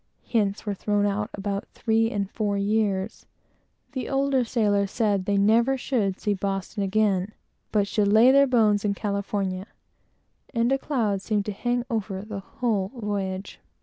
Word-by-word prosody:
Hints 205 Hz, -3 st, 0 dB
were 205 Hz, -, -1 dB
thrown 205 Hz, +1 st, 0 dB
out 205 Hz, +1 st, -1 dB
about 200 Hz, 0 st, -3 dB
three 225 Hz, -1 st, 0 dB
years 225 Hz, 0 st, +2 dB
and 200 Hz, -1 st, -2 dB
four 205 Hz, -2 st, -1 dB
years; 200 Hz, -1 st, -1 dB, 0.6 s
the 260 Hz, -4 st, -4 dB
older 275 Hz, -1 st, +2 dB
sailors 205 Hz, -4 st, +1 dB
said 205 Hz, -4 st, 0 dB
they 200 Hz, 0 st, +1 dB
never 230 Hz, +6 st, +3 dB
should 215 Hz, -8 st, -1 dB
see 210 Hz, -, 0 dB
Boston 195 Hz, +1 st, -3 dB
again, 200 Hz, 0 st, +1 dB, 0.4 s
but 205 Hz, -2 st, +2 dB
should 205 Hz, +1 st, +1 dB
lay 220 Hz, +5 st, +6 dB
their 280 Hz, +1 st, +6 dB
bones 215 Hz, -5 st, +3 dB
in 200 Hz, -1 st, 0 dB
California; 200 Hz, -2 st, -2 dB, 0.9 s
and 235 Hz, +2 st, +2 dB
a 270 Hz, -, +2 dB
cloud 220 Hz, -10 st, -1 dB
seemed 205 Hz, -1 st, -1 dB
to 210 Hz, -, -2 dB
hang 245 Hz, +4 st, -1 dB
over 200 Hz, -4 st, -3 dB
the 210 Hz, -2 st, -6 dB
whole 205 Hz, -1 st, -1 dB
voyage. 200 Hz, -3 st, -4 dB
205 Hz, 160 wpm, -25 LUFS, 200-225 Hz, 0.9 s, lay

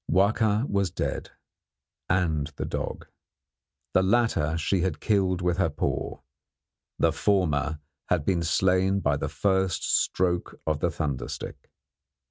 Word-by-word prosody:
Wahka 105 Hz, -, +3 dB
was 100 Hz, -2 st, +1 dB
dead, -, -, -3 dB, 0.8 s
and 80 Hz, -5 st, +1 dB
the -, -, -3 dB
dog. -, -, -4 dB, 0.9 s
The 95 Hz, -, +5 dB
latter 95 Hz, -7 st, +2 dB
she 85 Hz, +3 st, +1 dB
had 95 Hz, -4 st, -1 dB
killed 95 Hz, -4 st, +1 dB
with 90 Hz, 0 st, +1 dB
her 90 Hz, -4 st, +2 dB
paw; 75 Hz, -, -3 dB, 0.8 s
the -, -, +3 dB
former 80 Hz, -7 st, +1 dB, 0.3 s
had 85 Hz, -5 st, +1 dB
been 90 Hz, -3 st, +1 dB
slain 95 Hz, +3 st, +2 dB
by 70 Hz, -3 st, +1 dB
the 70 Hz, +1 st, -3 dB
first 95 Hz, +1 st, +1 dB
stroke 90 Hz, -1 st, 0 dB
of 75 Hz, -2 st, 0 dB
the -, -, +1 dB
thunder 70 Hz, -4 st, -3 dB
stick. -, -, -8 dB
90 Hz, 130 wpm, -27 LUFS, 80-95 Hz, 0.9 s, The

